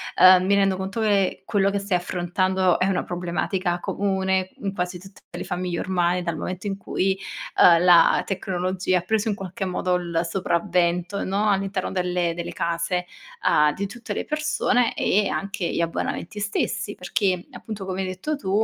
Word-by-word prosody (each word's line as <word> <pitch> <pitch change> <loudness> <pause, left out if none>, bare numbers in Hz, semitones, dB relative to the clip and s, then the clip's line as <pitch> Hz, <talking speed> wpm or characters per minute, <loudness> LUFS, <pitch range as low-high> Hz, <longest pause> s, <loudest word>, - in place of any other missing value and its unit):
Ehm, 185 0 +7
mi 200 - +3
rendo 195 -1 +2
conto 190 +4 -3
che 200 -3 +1
quello 200 -1 +2
che 200 - -1
stai 200 -2 0
affrontando 180 +1 +1
è - - +3
una 190 -2 0
problematica 175 +1 -2
comune 190 -1 0
n 200 -1 -3
quasi 180 -1 -3
tutte 195 +1 -15
le - - -4
famiglie 180 -1 -3
ormai 180 -1 +1
dal 170 -3 -3
momento 185 +5 -4
in 195 0 -2
cui, 190 0 -1 0.4
uhm, 170 0 +7
la 175 -2 +6
tecnologia 185 -1 -1
ha - - -7
preso 220 +4 0
in 210 - 0
qualche 195 +1 -5
modo 180 0 0
l 170 -2 -1
sopravvento, 175 +1 0
no, 205 +3 0
all'interno 195 -1 -1
delle 180 -2 0
delle 170 0 -5
case, 170 +2 -1 0.4
uhm, 150 0 +4
di 200 0 -3
tutte 240 +3 -7
le - - -2
persone 300 -6 +1
e 205 +1 +2
anche 195 -3 -2
gli - - -1
abbonamenti 170 +4 -3
stessi. 205 0 -2
Perché 180 0 -1
appunto 215 -5 -7
come 190 0 -3
hai 190 - -2
detto 185 +12 -3
tu, 275 -10 -6
185 Hz, 175 wpm, -24 LUFS, 180-200 Hz, 0.4 s, Ehm